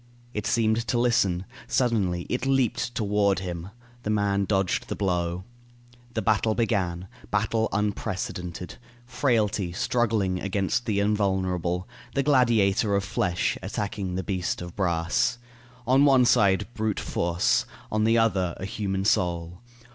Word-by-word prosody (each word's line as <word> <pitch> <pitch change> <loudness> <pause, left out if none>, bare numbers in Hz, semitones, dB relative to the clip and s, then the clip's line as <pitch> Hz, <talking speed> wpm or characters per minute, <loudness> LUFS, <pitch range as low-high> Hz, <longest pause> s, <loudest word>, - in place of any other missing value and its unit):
It 105 -1 -3
seemed 115 -1 +1
to 120 - +1
listen. 100 -7 +2 0.2
Suddenly 100 -9 +1
it 125 +1 -2
leaped 125 -3 +1
toward 100 -2 +2
him. 90 -1 -5 0.3
The 105 - -4
man 100 -2 +1
dodged 95 -2 0
the - - -3
blow. 90 -2 -1 0.7
The 110 - -1
battle 110 0 +2
began. 95 -6 -1 0.2
Battle 110 +2 +1
unprecedented. 95 -4 -3 0.3
Frailty 110 -7 0
struggling 105 -2 0
against 100 +4 -1
the 105 -2 +1
invulnerable. 95 -3 0 0.3
The 140 - +2
gladiator 115 -7 +3
of 100 - +1
flesh 100 -4 -1
attacking 100 -3 -3
the 95 - -2
beast 95 -3 -2
of 85 -1 -8
brass. 85 +3 +1 0.5
On 130 +3 +4
one 135 -3 +6
side, 100 -5 +4
brute 110 -3 -1
force; 85 +1 +1 0.2
on 110 0 +1
the 115 +1 +4
other, 95 -6 +1
a 95 - -5
human 95 -1 -2
soul. 85 -2 0
100 Hz, 130 wpm, -26 LUFS, 90-115 Hz, 0.7 s, one